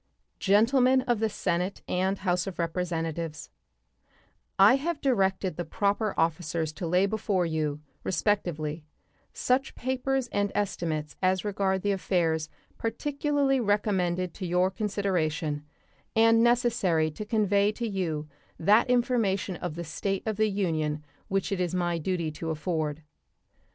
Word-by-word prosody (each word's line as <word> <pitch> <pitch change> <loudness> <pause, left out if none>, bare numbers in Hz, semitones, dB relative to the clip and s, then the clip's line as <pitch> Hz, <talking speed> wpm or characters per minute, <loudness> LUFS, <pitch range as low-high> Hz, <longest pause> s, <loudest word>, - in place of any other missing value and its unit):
Gentlemen 250 +6 +4
of 240 -3 0
the 220 0 +1
Senate 180 -1 -2
and 190 +2 0
House 180 -1 0
of 190 - -5
Representatives: 165 -2 -3 1.1
I 205 +7 +7
have 315 +2 -2
directed 195 - +1
the 175 - -1
proper 200 +5 0
officers 160 -1 0
to 175 +1 -4
lay 180 +3 +3
before 200 -3 0
you, 155 -2 -2 0.2
respectively, 165 -5 -1 0.5
such 260 +2 0
papers 260 0 -1
and 205 -2 0
estimates 160 -7 -2
as 185 +1 +1
regard 195 -2 0
the 205 - +2
affairs 165 -5 0 0.3
particularly 280 +2 0
recommended 190 -5 0
to 185 - -5
your 180 +2 +2
consideration, 180 -8 -1 0.5
and 225 0 +5
necessary 230 -10 +2
to 180 - -6
convey 205 -1 +2
to 235 +1 -3
you 165 -7 -2 0.3
that 210 +8 +4
information 230 -7 +1
of 175 -3 -5
the 170 - -4
state 190 +5 -3
of 220 -1 -1
the 215 0 +3
Union 155 -6 -1 0.2
which 195 0 -1
it 195 -2 0
is 180 0 -1
my 175 -1 0
duty 170 -1 -1
to 160 +2 -5
afford. 155 -1 -2
190 Hz, 135 wpm, -28 LUFS, 165-215 Hz, 1.1 s, I